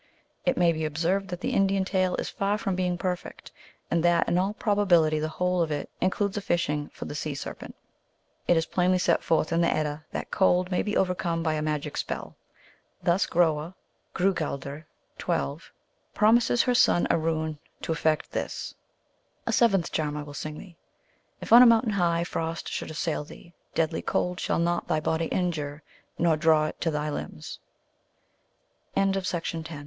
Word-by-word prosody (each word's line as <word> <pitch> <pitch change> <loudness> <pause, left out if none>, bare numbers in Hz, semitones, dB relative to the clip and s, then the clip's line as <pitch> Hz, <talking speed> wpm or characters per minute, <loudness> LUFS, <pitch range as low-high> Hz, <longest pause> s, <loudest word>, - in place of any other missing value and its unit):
It 265 - +2
may 175 -1 +4
be 160 -1 -3
observed 170 +6 0
that 180 -1 -6
the - - -1
Indian 195 -1 +2
tale 185 -2 +1
is - - -3
far 200 +1 -1
from 195 -2 -2
being 180 -1 0
perfect, 180 0 -5 0.4
and 170 -1 +2
that 175 -1 +3
in 175 - +2
all 195 +3 0
probability 175 -8 +3
the 155 - -1
whole 180 +2 0
of 165 - 0
it 145 -1 -3
includes 200 +2 0
a - - -1
fishing 150 -5 -1
for - - -9
the - - -6
sea 150 -1 -3
serpent. - - -7 0.7
It 175 - +4
is 165 - +1
plainly 180 +1 +2
set 175 -2 +2
forth 160 0 +1
in 170 - +3
the 170 - +3
Edda 155 0 -2
that - - -5
Cold 185 -1 +2
may 180 - +2
be 210 - -1
overcome 175 -3 0
by 160 -2 +1
a 155 - -1
magic 150 -1 -2
spell. - - -4 0.7
Thus 175 +2 +2
Groa 165 0 +1 0.4
(Grou 190 +2 +2
galdr, 145 -1 -4 0.3
12) 70 0 -2 0.4
promises 230 +2 +4
her 250 - +2
son 240 -7 +4
a - - +3
rune 160 -1 -2 0.2
to - - -2
effect 155 -1 0
this: - - -4 0.4
" - - -43
A - - 0
seventh 195 -7 +3
(charm) 150 -1 -1
I 150 - -4
will 145 0 -10
sing 150 +1 -5
thee: 170 -1 -12 0.6
If - - 0
on 240 - +11
a 250 - +9
mountain 230 -1 +4
high 170 -3 +1
frost 165 -1 -3
should - - -4
assail 155 0 -2
thee, 170 +3 -14 0.2
deadly 160 0 0
cold 180 0 -1
shall - - 0
not 170 +1 0
thy 155 - +1
bod 160 +1 -1
170 Hz, 165 wpm, -27 LUFS, 155-190 Hz, 0.7 s, on